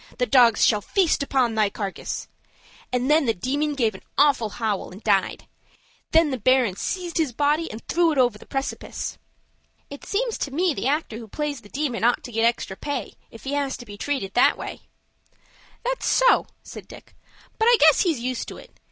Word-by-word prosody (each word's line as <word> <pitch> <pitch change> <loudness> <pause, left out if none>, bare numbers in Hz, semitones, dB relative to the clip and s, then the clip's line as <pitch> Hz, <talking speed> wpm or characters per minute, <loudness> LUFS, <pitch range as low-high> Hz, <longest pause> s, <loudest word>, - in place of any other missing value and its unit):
The 250 - +1
dogs 245 -4 +5
shall 210 -2 +3
feast 360 - +1
upon 260 -4 +1
thy 215 -2 +2
carcass!' 200 -1 -5 0.6
and 250 0 0
then 300 -1 +3
the 225 - +2
Demon 285 +9 -1
give 230 -5 +1
an 190 - -11 0.2
awful 270 -7 +3
howl 210 -2 -3
and 195 +4 -13
died. 200 -3 +1 0.6
Then 325 -2 +4
the 260 - -3
Baron 250 -4 +3
seized 350 - -3
his 310 -5 +1
body, 295 +5 +1
and 220 +2 -10
threw 340 -1 +2
it 300 - -2
over 245 -5 +2
the - - -15
precipice." 270 0 -4 0.7
"It 285 - -9
seems 465 +2 -2
to - - -2
me 335 +5 +1
the 260 - -2
actor 285 -6 -1
who 230 - -10
plays 295 +4 -4
the 205 - -16
Demon 270 -4 -2
ought 240 +1 +2
to 245 - -8
get 225 0 +1
extra 235 -4 0
pay, 285 +7 -4 0.2
if 225 - -14
he 275 - -4
has 280 -2 -1
to 240 - -11
be 205 -2 -10
treated 205 -5 -3
that 245 - +4
way." - - -7 1.0
"That's - - -1
so," - - +4 0.2
said - - -10
Dick; - - -14 0.4
"but 445 - +3
I 480 0 +6
guess - - +7
he's 330 -9 +1
used 255 0 -3
to - - -8
it. - - -16
260 Hz, 200 wpm, -24 LUFS, 225-300 Hz, 1.0 s, guess